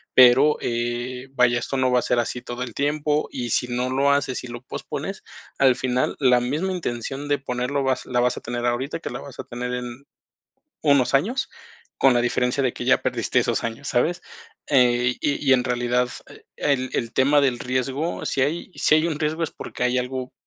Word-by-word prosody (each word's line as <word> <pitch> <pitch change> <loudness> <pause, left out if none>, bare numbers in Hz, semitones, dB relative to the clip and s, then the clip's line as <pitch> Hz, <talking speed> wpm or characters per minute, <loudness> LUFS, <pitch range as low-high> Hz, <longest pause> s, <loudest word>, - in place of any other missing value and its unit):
pero, 130 +4 +7
eh, 120 +2 -3
vaya, 120 -2 +3
esto 130 - -4
no 130 -1 +2
va 125 - +4
a - - -2
ser 120 - 0
así 120 +1 -2
todo 120 +1 -5
el 120 -3 -7
tiempo 150 +1 0
y, 120 -3 -4
si 125 - +1
no 125 +1 -1
lo 140 +2 +2
haces 135 -3 -1
y - - -7
lo 120 0 -8
pospones, 125 - -6 0.4
al 130 -2 +5
final, 130 0 0
la 125 -3 +5
misma 150 +10 -1
intención 135 -4 -4
de 145 0 +2
ponerlo 135 +1 -2
vas 130 -1 0
la 125 -1 +1
vas 125 0 +1
a - - -6
tener 120 0 -4
ahorita, 130 +6 -1
que - - -6
la - - -5
vas 140 - -11
a - - -3
tener 125 +1 -5
en 125 +2 -6 0.8
unos 140 -3 +3
años, 215 - +1 0.5
con 135 -2 +5
la 120 - +3
diferencia 125 +2 0
de 125 - 0
que - - -5
ya - - +4
perdiste - - 0
esos - - -1
años, 115 +5 -4
¿sabes? 160 +8 +1 0.5
Eh, 125 -3 +3
y 145 -1 -1
y - - +8
en 125 - +1
realidad, 125 0 +1 0.2
eh, - - -15
el 130 -3 0
el 115 0 -2
tema 145 +3 +4
del 130 -4 +1
riesgo, 130 +6 -2
si 135 - 0
hay 160 +7 -1
si - - +3
hay 155 +2 +2
un 155 -3 -2
riesgo 155 +2 -1
es 160 - -1
porque - - -7
hay 125 +1 +2
algo 130 0 -4
130 Hz, 210 wpm, -23 LUFS, 125-140 Hz, 0.8 s, y